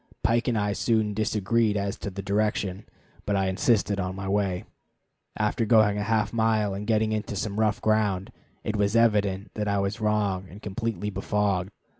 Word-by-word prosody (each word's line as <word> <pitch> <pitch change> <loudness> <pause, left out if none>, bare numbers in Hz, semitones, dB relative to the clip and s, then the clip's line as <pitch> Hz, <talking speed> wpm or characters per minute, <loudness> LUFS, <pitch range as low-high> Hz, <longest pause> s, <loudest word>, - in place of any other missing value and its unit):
Pike 115 +1 +2
and 120 -3 +1
I 105 -1 0
soon 110 -1 +1
disagreed 110 +1 +1
as 100 0 -2
to - - -5
the 100 0 -6
direction, 100 -1 -1 0.4
but 100 - 0
I 95 -1 +1
insisted 100 +1 +1
on 95 0 -2
my 95 0 -5
way. 95 -2 0 0.7
After 105 +2 0
going 110 -2 +4
a - - -1
half 110 0 0
mile 110 -3 +2
and 100 +2 -5
getting 110 -1 +2
into 105 -1 -2
some 105 +1 -3
rough 110 +1 +2
ground, 105 -3 +1 0.3
it 110 - -2
was 100 +1 +1
evident 105 -3 +2
that 105 -1 -2
I 100 0 +1
was 100 +3 -2
wrong 105 -3 0
and 100 - -11
completely 105 0 -3
befogged. 100 -1 0
105 Hz, 180 wpm, -26 LUFS, 100-110 Hz, 0.7 s, going